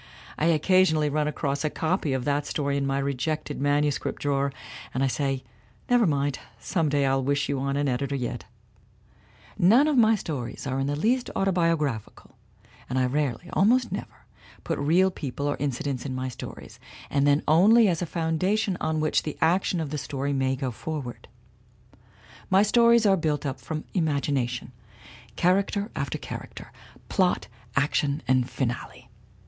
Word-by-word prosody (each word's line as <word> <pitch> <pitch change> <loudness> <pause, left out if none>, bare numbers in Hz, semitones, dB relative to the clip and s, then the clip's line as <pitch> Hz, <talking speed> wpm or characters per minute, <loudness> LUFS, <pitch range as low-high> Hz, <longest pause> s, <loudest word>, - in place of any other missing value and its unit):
I 155 - +1
occa 170 +3 +4
sionally 155 -5 +2
run 150 0 +1
across 140 -1 -2
a 155 - +1
copy 160 -1 -1
of 130 -2 -1
that 145 0 0
story 140 -2 -1
in 140 -1 0
my 135 0 0
rejected 140 +2 -2
manuscript 145 0 0
drawer 140 -1 0 0.4
and 130 - +1
I - - +4
say, 135 0 -1 0.5
'Never 240 -4 +5
mind 140 -2 0 0.2
some 165 0 0
day 145 -1 +2
I'll 135 0 +1
wish 140 +2 0
you 140 -2 -1
on 140 +1 -1
an 145 0 +1
editor, 140 +2 -1
yet/ 125 -3 -4 1.1
"None 230 - +6
of 295 -5 +3
my 225 -1 +5
stories 140 - -5
are 135 0 -2
in 135 - 0
the 145 - -1
least 245 - +1
autobiographi 165 - 0
cal, 130 - -19 0.5
and 130 - -1
I 130 - +3
rarely 140 +3 -1
almost 235 +5 +3
never - - -7 0.4
put - - -2
real 175 +7 +3
people 140 -4 -5
or 145 - +1
in 145 - 0
cidents 130 0 -3
in 130 -2 -4
my 130 0 -3
stories, 125 - -9 0.3
and 140 0 +2
then 145 +1 +3
only 205 +9 +6
as 175 -3 0
a 175 - -2
foundation 180 +5 0
on 155 -1 0
which 155 - +2
the 150 - -6
action 175 +2 +2
of 155 -3 -3
the 150 - -2
story 140 +1 -3
may 135 -1 +1
go 130 -1 -3
forward. 135 0 -6 1.2
My 190 +2 +5
stories 235 +1 +5
are 195 -2 +5
built 150 -3 -1
up 135 -2 -3
from 155 -1 -4
my - - -16
imagination, 140 -7 -1 0.6
character 200 - +1
after 140 -4 -2
character, - - -8 0.4
plot, - - +1 0.3
action 140 0 +1
and 130 0 +2
finale. 125 0 -4
145 Hz, 170 wpm, -26 LUFS, 135-170 Hz, 1.2 s, None